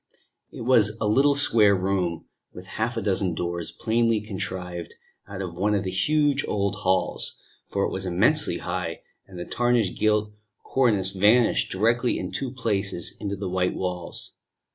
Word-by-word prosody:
It -, -, -9 dB
was 115 Hz, -3 st, +3 dB
a -, -, -1 dB
little 140 Hz, +7 st, +4 dB
square 110 Hz, -7 st, +5 dB
room, 90 Hz, -3 st, -1 dB, 0.3 s
with 90 Hz, -, -11 dB, 0.2 s
half 120 Hz, +1 st, -1 dB
a 115 Hz, -, -2 dB
dozen 95 Hz, -3 st, 0 dB
doors, 85 Hz, 0 st, -3 dB
plainly 115 Hz, -1 st, +1 dB
contrived 90 Hz, -4 st, -6 dB, 0.3 s
out 95 Hz, -1 st, -6 dB
of 85 Hz, -1 st, -7 dB
one 105 Hz, +2 st, +2 dB
of 100 Hz, -, 0 dB
the 95 Hz, -, -3 dB
huge 145 Hz, +8 st, +2 dB
old 100 Hz, -1 st, 0 dB
halls, 95 Hz, 0 st, -1 dB, 0.3 s
for 100 Hz, -, -1 dB
it -, -, -3 dB
was 95 Hz, 0 st, -4 dB
immensely 110 Hz, -, +3 dB
high, 90 Hz, -2 st, -4 dB, 0.2 s
and 95 Hz, -2 st, -12 dB
the 90 Hz, -, -5 dB
tarnished 120 Hz, -5 st, 0 dB
gilt 105 Hz, -1 st, +1 dB, 0.3 s
cornice 105 Hz, -8 st, +2 dB
vanished 105 Hz, -, +3 dB
directly 115 Hz, +5 st, +1 dB
in 90 Hz, -, -5 dB
two 135 Hz, -, -3 dB
places 105 Hz, -8 st, -1 dB
into 100 Hz, -1 st, -3 dB
the 100 Hz, 0 st, -5 dB
white 90 Hz, 0 st, 0 dB
walls. 90 Hz, -2 st, -4 dB
100 Hz, 165 wpm, -25 LUFS, 90-115 Hz, 0.3 s, square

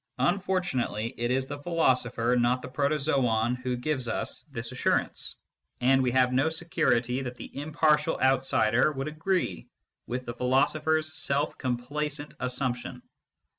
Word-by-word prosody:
Unfortunately 175 Hz, -, 0 dB
it 120 Hz, 0 st, -1 dB
is 130 Hz, +1 st, +1 dB
the 145 Hz, +1 st, -6 dB
philoso 145 Hz, -7 st, +1 dB
pher, 120 Hz, +1 st, +1 dB
not 125 Hz, +1 st, +1 dB
the -, -, -5 dB
protozoon, 135 Hz, -4 st, +1 dB
who 125 Hz, 0 st, -3 dB
gives 130 Hz, -1 st, -1 dB
us 115 Hz, -, -3 dB
this 115 Hz, -2 st, -4 dB
assurance, 130 Hz, -, 0 dB, 0.4 s
and 130 Hz, +2 st, +4 dB
we 130 Hz, -, +2 dB
can 125 Hz, -, 0 dB
have 125 Hz, 0 st, +3 dB
no 135 Hz, +5 st, +3 dB
security 130 Hz, -6 st, 0 dB
that 125 Hz, -2 st, -5 dB
the -, -, -10 dB
impartial 150 Hz, +2 st, +1 dB
outsider 130 Hz, -1 st, +3 dB
would 135 Hz, 0 st, -4 dB
agree 160 Hz, -, -1 dB, 0.4 s
with 125 Hz, +2 st, -4 dB
the 120 Hz, -, -4 dB
philosopher 135 Hz, +6 st, +2 dB
s 155 Hz, 0 st, -4 dB
self 140 Hz, +2 st, 0 dB
complacent 145 Hz, +4 st, -3 dB
assumption. 125 Hz, -1 st, -3 dB
130 Hz, 145 wpm, -28 LUFS, 125-150 Hz, 0.4 s, and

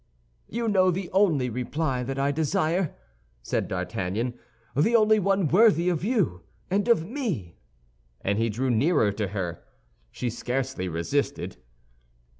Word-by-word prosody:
"You 230 Hz, +1 st, -2 dB
know 190 Hz, -3 st, +4 dB
the 180 Hz, 0 st, -2 dB
only 175 Hz, -10 st, +3 dB
reply 130 Hz, +3 st, -1 dB
that 135 Hz, +2 st, -4 dB
I 140 Hz, +1 st, +1 dB
desire," 160 Hz, +3 st, 0 dB, 0.5 s
said -, -, -1 dB
D'Artagnan, 105 Hz, +7 st, -2 dB, 0.4 s
"the 190 Hz, -, +3 dB
only 215 Hz, -1 st, +5 dB
one 195 Hz, -2 st, +2 dB
worthy 180 Hz, -1 st, +5 dB
of 170 Hz, -2 st, -1 dB
you 190 Hz, -, 0 dB, 0.3 s
and 200 Hz, +3 st, +1 dB
of 230 Hz, -9 st, +3 dB
me!" 195 Hz, -, -4 dB, 0.6 s
And 100 Hz, +2 st, 0 dB
he 115 Hz, 0 st, +1 dB
drew 125 Hz, +4 st, -1 dB
nearer 120 Hz, -, +3 dB
to 105 Hz, 0 st, -2 dB
her. 90 Hz, -4 st, -4 dB, 0.5 s
She 120 Hz, -, -3 dB
scarcely 125 Hz, -4 st, -2 dB
resisted. 90 Hz, -, -2 dB
145 Hz, 135 wpm, -26 LUFS, 115-190 Hz, 0.6 s, only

